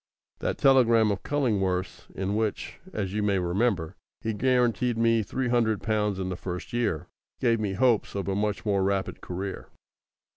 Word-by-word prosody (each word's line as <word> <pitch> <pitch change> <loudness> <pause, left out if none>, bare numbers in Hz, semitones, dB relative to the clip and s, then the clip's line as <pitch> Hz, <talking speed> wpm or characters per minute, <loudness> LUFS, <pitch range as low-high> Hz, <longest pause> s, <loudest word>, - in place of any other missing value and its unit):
That - - -2
telegram 115 -5 +5
of 100 - -2
Cullingworth's 95 -10 -1
in 95 +2 -2
which, 110 -1 -2
as 100 -3 -3
you 105 - 0
may 100 -2 +2
remember, 90 -1 0 0.3
he 110 - -2
guaranteed 120 0 +1
me 115 0 +3
three 125 +4 -2
hundred 115 -4 +1
pounds 105 -3 0
in 95 -1 -3
the 90 - -3
first 90 +3 -6
year, 115 -10 0 0.3
gave 115 -3 +2
me 105 -3 -1
hopes 115 0 +2
of 100 -1 -3
a 100 - 0
much 105 +1 -1
more 100 -2 +2
rapid 95 0 -1
career. 95 +2 -5
105 Hz, 170 wpm, -27 LUFS, 95-115 Hz, 0.3 s, telegram